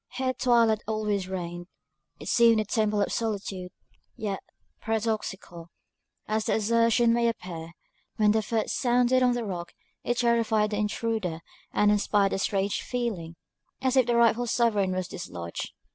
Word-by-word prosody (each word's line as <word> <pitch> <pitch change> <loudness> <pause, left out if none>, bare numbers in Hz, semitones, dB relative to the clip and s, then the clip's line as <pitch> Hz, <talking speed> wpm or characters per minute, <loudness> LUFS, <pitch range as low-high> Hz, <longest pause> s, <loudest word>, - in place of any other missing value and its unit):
Here 260 0 -1
twilight 230 -4 +3
always 210 -3 -1
reigned 175 -2 -5 0.5
it - - -9
seemed 230 -2 +5
the 215 - 0
Temple 210 0 +1
of - - -3
Solitude; 195 -5 -3 0.4
yet, 200 -3 -3 0.4
paradoxical 210 -6 -3 0.6
as 215 0 -1
the - - +1
assertion 230 +2 +3
may 235 0 +2
appear, 170 -7 -5 0.4
when 210 -1 +4
the 220 +1 +2
foot 220 +1 -1
sounded 250 0 +2
on 250 -1 +4
the 240 -2 -2
rock, 175 -4 -5 0.3
it 240 - -1
terrified 230 -3 +2
the 210 - -1
intruder, 210 -5 -2 0.3
and 210 0 +3
inspired 205 -1 +2
a - - -1
strange 195 0 0
feeling, 210 -10 -3 0.4
as 260 0 0
if 260 -3 +4
the 240 - +2
rightful 235 +1 +3
sovereign 215 -5 +2
was 185 -1 -2
dislodged. 85 - -6
215 Hz, 150 wpm, -27 LUFS, 195-235 Hz, 0.6 s, seemed